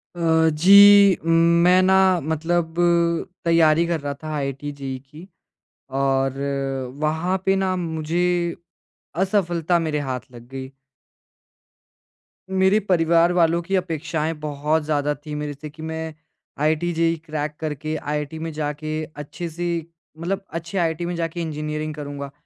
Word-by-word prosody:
अ, 160 -1 +3
जी। 200 +4 +7
मैं 170 +2 +4
ना 190 +1 +4 0.3
मतलब 160 +2 -1 0.7
तैयारी 165 -1 +4
कर 170 -1 -1
रहा 145 0 -3
था 155 - -5
आईआईटी-जेईई 140 -1 -4
की 150 +7 -14 0.7
और 135 0 +1 0.6
वहाँ 160 +5 0
पे 195 0 +3
ना 190 -1 0
मुझे 165 -1 -2 1.0
असफलता 175 -3 +1
मेरे 155 -3 -1
हाथ 130 -1 -2
लग 120 -1 -12
गई। 130 0 -7 1.8
मेरे 190 +2 +3
परिवार 170 -3 +3
वालों 170 -1 +3
की 195 +3 -2
अपेक्षाएँ 165 -3 -2
बहुत 150 +1 -1
ज़्यादा 150 -1 0
थीं 150 +1 -8
मेरे 150 0 -4
से 150 +2 -9
कि 155 +2 -14
मैं 160 0 -4 0.5
आईआईटी-जेईई 165 +2 +1
क्रैक 150 -1 -4
करके 155 0 -4
आईआईटी 150 +1 -4
में 165 +1 -4
जाके 155 +1 -3
अच्छी 150 +4 -6
सी 170 0 -3 0.3
मतलब, 180 +5 -2
अच्छे 170 +4 -5
आईआईटी 165 -1 0
में 175 0 -3
जाके 165 0 -3
इंजीनियरिंग 155 -1 -4
करूँगा। 140 -1 -6
160 Hz, 130 wpm, -22 LUFS, 150-170 Hz, 1.8 s, जी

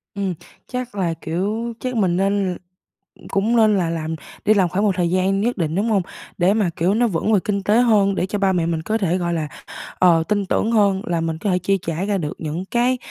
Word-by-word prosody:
Ừm, 195 -2 -1 0.3
chắc 250 -3 -5
là, 180 -4 0
kiểu 205 +9 -3
chắc 255 -1 -3
mình 185 -5 +1
nên 195 -2 0 0.7
cũng 215 +5 +1
nên 215 -2 +4
là 175 -3 0
làm 160 -1 -3 0.3
đi 215 - +5
làm 190 -4 +2
khoảng 190 +4 -1
một 200 -3 +2
thời 175 -2 +1
gian 190 +2 +1
nhất 240 +1 0
định, 160 -3 -1
đúng 205 +5 0
hông? 205 -3 +3 0.4
Để 185 +2 +3
mà, 210 -4 +1
kiểu, 180 +5 +1
nó 240 +2 +2
vững 210 +2 0
về 205 - +5
kinh 200 -2 -1
tế 210 +4 +3
hơn. 205 -5 +3
Để 180 - 0
cho 205 +2 -3
ba 195 -1 +2
mẹ 175 -3 +1
mình 165 -1 -1
có 215 +6 -1
thể, 185 -3 0
gọi 175 -1 -1
là, 155 -2 -2 0.5
ờ, 170 -3 +5
tin 205 +2 -1
tưởng 220 +4 0
hơn 200 -4 +3
là 170 -1 -1
mình 165 -1 -2
có 200 - -2
thể 180 - +2
chi 195 +2 +1
trả 165 +3 -3
ra 205 -1 0
được 150 -4 -3
những 160 +3 -4
cái, 245 +4 +1
195 Hz, 245 wpm, -21 LUFS, 175-210 Hz, 0.7 s, đi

